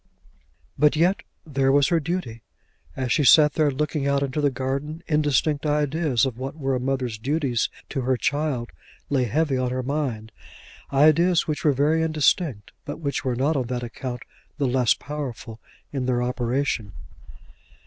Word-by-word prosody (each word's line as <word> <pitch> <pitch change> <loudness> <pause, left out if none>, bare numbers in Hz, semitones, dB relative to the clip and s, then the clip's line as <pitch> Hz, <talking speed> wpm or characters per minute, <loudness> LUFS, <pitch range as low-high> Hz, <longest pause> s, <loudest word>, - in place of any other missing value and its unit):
But 150 +1 +4
yet 175 +5 +2 0.2
there 135 -3 +1
was 140 0 +4
her 170 - +3
duty! 150 -8 -4 0.5
As 130 -2 -2
she 150 - +3
sat 150 +2 +7
there 155 -2 +2
looking 145 +1 -1
out 140 0 +1
into 140 +2 -2
the 145 - +3
garden 140 +5 -4
indistinct 150 -1 +1
ideas 150 -4 +1
of 125 -2 -4
what 135 +4 -5
were 135 -3 -1
a 130 - 0
mother's 125 -4 -2
duties 135 -2 0 0.2
to 135 - -2
her 130 0 +1
child 145 -4 -1 0.4
lay 130 -3 +2
heavy 135 +2 0
on 130 -1 0
her 130 +1 -2
mind, 125 -6 -3 0.6
ideas 155 +5 +4
which 155 -1 -3
were 150 - +4
very 150 +4 +2
indistinct, 155 - +1
but 145 - -6
which 140 -3 -2
were 130 -3 -1
not 140 +6 +1
on 130 -4 -1
that 125 0 -3
account 125 +1 -6 0.3
the 145 - 0
less 125 -2 +3
powerful 125 -6 -7 0.3
in 130 -2 -2
their 125 -1 +1
operation. 125 -4 -1
140 Hz, 165 wpm, -24 LUFS, 125-150 Hz, 0.6 s, sat